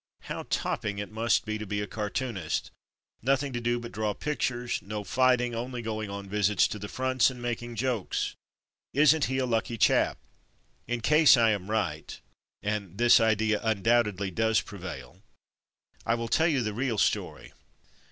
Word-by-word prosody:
How -, -, -6 dB
topping 105 Hz, -1 st, -2 dB
it 105 Hz, +1 st, -5 dB
must 115 Hz, +1 st, +1 dB
be 110 Hz, 0 st, -3 dB
to 110 Hz, -, -5 dB
be 105 Hz, +1 st, -2 dB
a 105 Hz, -, -2 dB
cartoonist; 105 Hz, -4 st, -3 dB, 0.5 s
nothing 135 Hz, +2 st, +1 dB
to 120 Hz, -, -3 dB
do 120 Hz, +1 st, 0 dB
but 120 Hz, 0 st, -8 dB
draw 105 Hz, -1 st, -2 dB
pictures; 125 Hz, -5 st, -2 dB
no 105 Hz, +1 st, -5 dB
fighting, 125 Hz, +1 st, +2 dB
only 120 Hz, +1 st, -4 dB
going 110 Hz, -2 st, -3 dB
on 100 Hz, 0 st, -6 dB
visits 105 Hz, -1 st, +2 dB
to 105 Hz, -, -5 dB
the 105 Hz, -, -6 dB
fronts 130 Hz, -1 st, +2 dB
and 125 Hz, -1 st, -9 dB
making 120 Hz, 0 st, -4 dB
jokes; 120 Hz, -3 st, -1 dB, 0.6 s
isn't 150 Hz, +1 st, +5 dB
he 130 Hz, -, -2 dB
a 130 Hz, -, +1 dB
lucky 115 Hz, -1 st, -1 dB
chap?'' -, -, +3 dB, 0.7 s
In 120 Hz, 0 st, -2 dB
case 150 Hz, +1 st, +6 dB
I 115 Hz, -1 st, +4 dB
am 100 Hz, -2 st, -3 dB
right 85 Hz, -9 st, -2 dB, 0.4 s
(and 100 Hz, -3 st, -3 dB
this 120 Hz, +1 st, +6 dB
idea 110 Hz, -1 st, +2 dB
undoubt 115 Hz, +2 st, +3 dB
edly 100 Hz, -2 st, -4 dB
does 110 Hz, +1 st, +2 dB
prevail), 90 Hz, -6 st, -9 dB, 0.8 s
I 115 Hz, -, +1 dB
will 115 Hz, 0 st, -3 dB
tell 160 Hz, +7 st, +3 dB
you 140 Hz, -7 st, +1 dB
the 105 Hz, -1 st, -2 dB
real 120 Hz, 0 st, -1 dB
story. -, -, -1 dB
115 Hz, 170 wpm, -28 LUFS, 105-120 Hz, 0.8 s, case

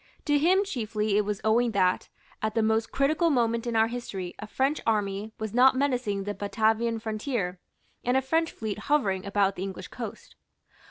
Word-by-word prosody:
To 290 Hz, -1 st, +3 dB
him 370 Hz, +6 st, +4 dB
chiefly 215 Hz, -, -1 dB
it 210 Hz, 0 st, +3 dB
was 210 Hz, -1 st, -3 dB
owing 230 Hz, +1 st, +2 dB
that, 185 Hz, -2 st, +1 dB, 0.3 s
at 215 Hz, 0 st, -1 dB
the 225 Hz, -, +2 dB
most 220 Hz, +1 st, +1 dB
critical 310 Hz, +5 st, +2 dB
moment 235 Hz, -3 st, +1 dB
in 235 Hz, -, -1 dB
our 220 Hz, 0 st, +5 dB
history, 215 Hz, -6 st, -5 dB
a 215 Hz, -, -7 dB
French 270 Hz, +7 st, 0 dB
army 210 Hz, -1 st, -1 dB
was 220 Hz, -1 st, -4 dB
not 255 Hz, +2 st, +6 dB
menacing 250 Hz, -7 st, 0 dB
the 205 Hz, +1 st, -3 dB
Batavian 225 Hz, +3 st, +1 dB
frontier 215 Hz, -4 st, -3 dB, 0.4 s
and 250 Hz, +2 st, +2 dB
a -, -, +3 dB
French 325 Hz, +5 st, +1 dB
fleet 215 Hz, -2 st, -4 dB
hovering 205 Hz, -9 st, 0 dB
about 200 Hz, -1 st, +2 dB
the -, -, -6 dB
English 190 Hz, -1 st, -5 dB
coast. 230 Hz, -4 st, -8 dB
220 Hz, 180 wpm, -27 LUFS, 205-255 Hz, 0.4 s, not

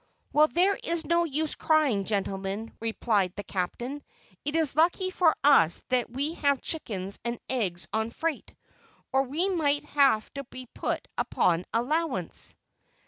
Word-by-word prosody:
"Well, 305 Hz, +1 st, +6 dB
there 370 Hz, +5 st, +2 dB
is 335 Hz, -1 st, -1 dB
no 340 Hz, 0 st, +2 dB
use 310 Hz, 0 st, -1 dB
crying, 290 Hz, -11 st, +2 dB
gentlemen," 200 Hz, +1 st, -3 dB
replied 215 Hz, -4 st, 0 dB
the 205 Hz, -, -5 dB
captain; 240 Hz, +10 st, -4 dB, 0.4 s
"it 295 Hz, +2 st, -2 dB
is 315 Hz, -4 st, +2 dB
lucky 355 Hz, +4 st, +2 dB
for 350 Hz, -4 st, +3 dB
us 175 Hz, -, +5 dB
that 255 Hz, -2 st, +1 dB
we 280 Hz, +6 st, -2 dB
have 280 Hz, -2 st, +3 dB
chickens 200 Hz, -, -3 dB
and 235 Hz, 0 st, -3 dB
eggs 190 Hz, -9 st, -2 dB
on 220 Hz, +1 st, 0 dB
freight, 320 Hz, +4 st, -3 dB, 0.6 s
or 265 Hz, -, +4 dB
we 295 Hz, +8 st, 0 dB
might 295 Hz, -6 st, +1 dB
have 275 Hz, -7 st, +3 dB
to 275 Hz, -, -5 dB
be 255 Hz, 0 st, -9 dB
put -, -, -3 dB
upon 175 Hz, 0 st, +1 dB
allowance." 245 Hz, -, -1 dB
270 Hz, 145 wpm, -27 LUFS, 215-315 Hz, 0.6 s, Well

